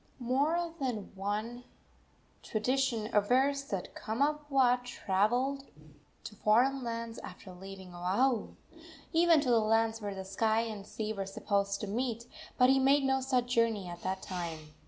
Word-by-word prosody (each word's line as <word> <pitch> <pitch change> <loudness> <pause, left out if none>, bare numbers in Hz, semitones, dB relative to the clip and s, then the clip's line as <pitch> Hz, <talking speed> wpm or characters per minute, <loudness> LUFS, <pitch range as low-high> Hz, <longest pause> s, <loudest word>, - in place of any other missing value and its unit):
III. 240 - -7
More 320 +6 +1
than 245 -7 -3
one 210 +5 -3 0.8
tradition 230 -1 0
avers 265 +7 +2
that 195 -8 -4
Kamapuaa 270 0 +1
traveled 245 +5 0 0.6
to 210 - -8
foreign 255 +5 +3
lands 230 -1 -4
after 185 0 -10
leaving 190 0 -10
Oahu, 205 +8 0 0.6
even 335 -1 +5
to 270 - -1
the 230 - +5
lands 225 +1 +1
where 205 -1 -4
the 190 0 -6
sky 220 +3 +1
and 215 -3 -6
sea 215 0 -3
were 195 -2 -4
supposed 200 0 -1
to - - -2
meet; 235 +2 -2 0.3
but 255 0 +6
he 270 - +4
made 275 +2 +4
no 265 0 +2
such 250 -2 0
journey 225 -5 +1
at 175 0 -8
that 190 0 -3
time. 165 -4 -5
230 Hz, 150 wpm, -31 LUFS, 200-265 Hz, 0.8 s, but